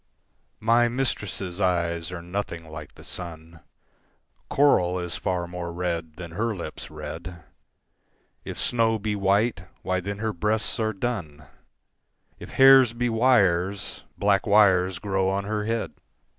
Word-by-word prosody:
MY 115 +2 +4
mistress' 105 -7 -3
eyes 85 -3 0
are 90 -2 -6
nothing 85 -2 -5
like 80 -2 -9
the - - -14
sun; 80 -1 -8 0.9
Coral 90 -11 +3
is 90 -1 -3
far 90 -2 -2
more 90 -1 -5
red 85 -2 -3
than 85 -1 -8
her 110 +5 -1
lips' 85 - -7
red; 85 -3 -8 1.0
If - - -7
snow 115 -2 +2
be 105 0 -2
white, 100 0 +1 0.2
why 95 0 0
then 100 +2 -5
her 110 0 -2
breasts 105 +6 0
are 110 -1 0
dun; 90 -9 -4 0.9
If - - -9
hairs 135 -3 +7
be 120 +1 -1
wires, 100 -6 +2
black 100 0 +2
wires 95 -3 +4
grow 95 -1 0
on 100 +1 -1
her 105 +1 -2
head. 115 0 -2
95 Hz, 135 wpm, -25 LUFS, 85-110 Hz, 1.0 s, hairs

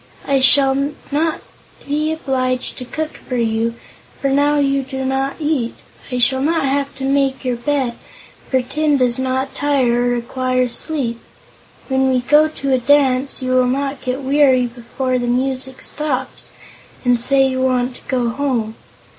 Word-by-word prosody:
I 275 -1 +2
shall 270 +1 +5 0.4
not 315 +3 0 0.5
be 305 +2 0
obliged 255 -5 -2
to 250 - -6
cook 310 +5 -5
for 255 - -6
you, 230 0 0 0.4
for 275 - 0
now 290 +2 +3
you 275 -1 +2
do 265 0 -5
not 270 +1 -1
eat; 295 -6 -1 0.4
I 250 - -1
shall 260 +2 +3
not 320 +1 +1
have 275 +1 -1
to 270 - -7
make 270 -1 0
your 250 -1 0
bed, 265 -1 -1 0.6
for 260 -1 +1
tin 300 +3 +1
does 250 -1 +1
not 260 +1 -1
tire 255 -4 +1
or - - +2
require 255 +1 0
sleep; 245 -3 -3 0.7
when 265 0 +2
we 255 -1 +2
go 295 +5 +4
to 275 -3 -2
a 260 - +3
dance, 265 0 +2
you 255 - -1
will 255 -1 +3
not 275 +1 -2
get 260 +1 -3
weary 265 -2 +4
before 250 +2 -3
the 245 - -2
music 260 +1 -1
stops 270 -4 -3 0.5
and 245 -1 +3
say 270 +3 +4
you 260 0 -2
want 255 -1 +1
to - - -17
go 250 -3 0
home. 240 -4 -1
265 Hz, 165 wpm, -18 LUFS, 250-280 Hz, 0.7 s, shall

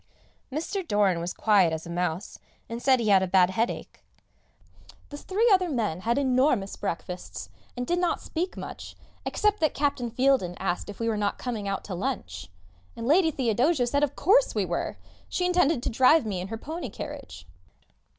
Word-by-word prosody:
Mr. 330 +8 -2
Doran 200 - +2
was 170 +1 -3
as - - -5
quiet 200 -6 +4
as 160 0 -4
a - - -9
mouse, 175 +1 -3 0.3
and 230 +1 -6
said 260 -1 +4
he 220 -2 0
had 195 -2 +6
a 190 - 0
bad 185 0 +4
headache. 225 +5 -3 1.1
The 290 - -7
three 405 +9 0
other 370 -2 +3
men 220 - -1
had 235 +6 0
enormous 255 -6 +2
breakfasts, 180 +2 -5 0.3
and 245 - -2
did 350 +6 0
not 355 -1 +1
speak 350 +3 -4
much, - - -8 0.3
except 420 0 +1
that 310 -3 +1
Captain 275 -4 0
Fieldin 250 -7 +2
asked 190 +1 -2
if 205 - -9
we 230 - -1
were 220 -2 0
not 205 -1 -1
coming 225 -5 -4
out 195 -1 -2
to 195 - -6
lunch; 90 - -4 0.5
and - - -6
Lady 325 +5 +4
Theodosia 260 +1 +1
said 285 +4 +1
of 285 -1 0
course 460 +10 +3
we - - +1
were - - -3 0.3
she 360 - -1
intended 350 -7 +2
to - - 0
drive 260 +5 +5
me 200 -4 -2
in 185 - -5
her 225 +2 -5
pony 305 +2 -6
carriage. 90 - -8
235 Hz, 190 wpm, -27 LUFS, 190-295 Hz, 1.1 s, had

